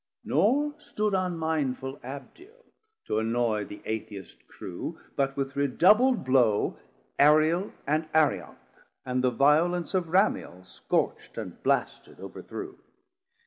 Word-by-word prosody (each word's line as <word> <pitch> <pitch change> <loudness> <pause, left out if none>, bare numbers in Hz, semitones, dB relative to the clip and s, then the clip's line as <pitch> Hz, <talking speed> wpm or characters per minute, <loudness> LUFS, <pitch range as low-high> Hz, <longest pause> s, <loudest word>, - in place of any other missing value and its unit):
Nor 290 +3 +2
stood 210 -8 -2
unmindful 160 -7 -1
Abdiel 360 - -11 0.4
to 105 - 0
annoy 110 -2 0
The 105 - -11
Atheist 105 -4 -6
crew, 95 - -7 0.2
but 135 -1 -1
with 135 0 -3
redoubl'd 210 - +4
blow 125 -5 +2 0.4
370 - - +7
Ariel 155 +6 +4
and 155 +2 0
Arioc, 100 - +1 0.5
and 125 0 -1
the 130 - +4
violence 155 +7 +2
Of 180 -3 0
Ramiel 180 - +1
scorcht - - -2
and - - -7
blasted - - -1
overthrew. - - -8
145 Hz, 115 wpm, -27 LUFS, 125-180 Hz, 0.5 s, 370